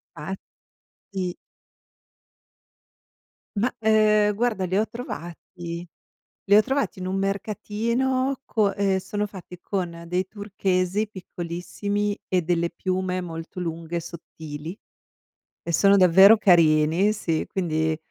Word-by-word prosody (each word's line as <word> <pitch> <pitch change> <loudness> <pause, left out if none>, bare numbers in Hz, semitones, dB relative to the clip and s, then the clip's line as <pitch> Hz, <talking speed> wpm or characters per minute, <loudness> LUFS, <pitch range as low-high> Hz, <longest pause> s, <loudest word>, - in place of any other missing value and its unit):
Fatti 190 +6 -8 3.0
Ma, 235 +5 +1
ehm, 215 -1 +4
guarda, 215 -3 0
li 185 +1 -1
ho 215 +2 +2
trovati 175 -5 -7 0.6
li 200 - +7
ho 210 - +8
trovati 270 -3 -1
in 185 - -5
un 185 +1 -2
mercatino, 235 +7 -1
co 210 -3 +1
e 195 -1 +1
sono 205 +2 -3
fatti 180 -3 -11
con 170 -4 -4
dei 180 +2 -1
turchesi 195 -1 -1
piccolissimi 200 +2 -4
e 185 -1 +1
delle 170 0 0
piume 185 0 -2
molto 165 0 -7
lunghe 165 -1 -4
e - - -2
sottili, 160 -1 -8 0.9
e 170 - -4
sono 200 +4 +5
davvero 190 +3 +8
carini 170 0 +4
sì, 165 -7 -2
quindi 160 -4 0
185 Hz, 115 wpm, -24 LUFS, 170-210 Hz, 3.0 s, ho